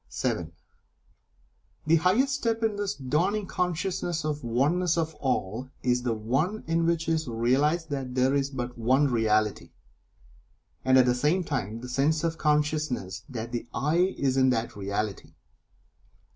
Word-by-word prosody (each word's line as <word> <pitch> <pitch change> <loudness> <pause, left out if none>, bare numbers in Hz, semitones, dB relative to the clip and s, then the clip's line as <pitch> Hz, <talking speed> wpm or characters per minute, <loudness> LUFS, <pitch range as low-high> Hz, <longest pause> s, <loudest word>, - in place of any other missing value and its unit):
(7) 80 -2 -2 1.3
The 165 +2 +5
highest 215 - +2
step 230 -4 -1
in 220 -2 +1
this 205 0 -2
dawning 170 +11 0
consciousness 180 -2 -2
of 150 -1 -2
the 120 - -6
Oneness 160 +9 +1
of 160 -1 -1
All, 125 -2 -2
is 125 -1 +2
the 120 -2 -1
one 135 - -1
in 165 0 +1
which 165 -1 0
is 160 -2 0
realized 140 +8 +1
that 130 -3 -4
there 130 +1 +3
is 140 -1 +1
but 125 -3 -5
One 130 +4 +3
Reality, 110 -2 +1 1.1
and 130 0 +5
at 130 - +6
the 125 - +3
same 150 +9 +1
time 110 - -3
the 125 - -7
sense 145 +5 +1
of 165 0 -1
consciousness 150 -9 0
that 115 -2 -5
the 120 0 -4
"I" 165 +9 +1
is 135 -1 +1
in 130 0 +5
that 115 -2 -1
Reality. 100 +1 -4
140 Hz, 155 wpm, -27 LUFS, 120-165 Hz, 1.3 s, at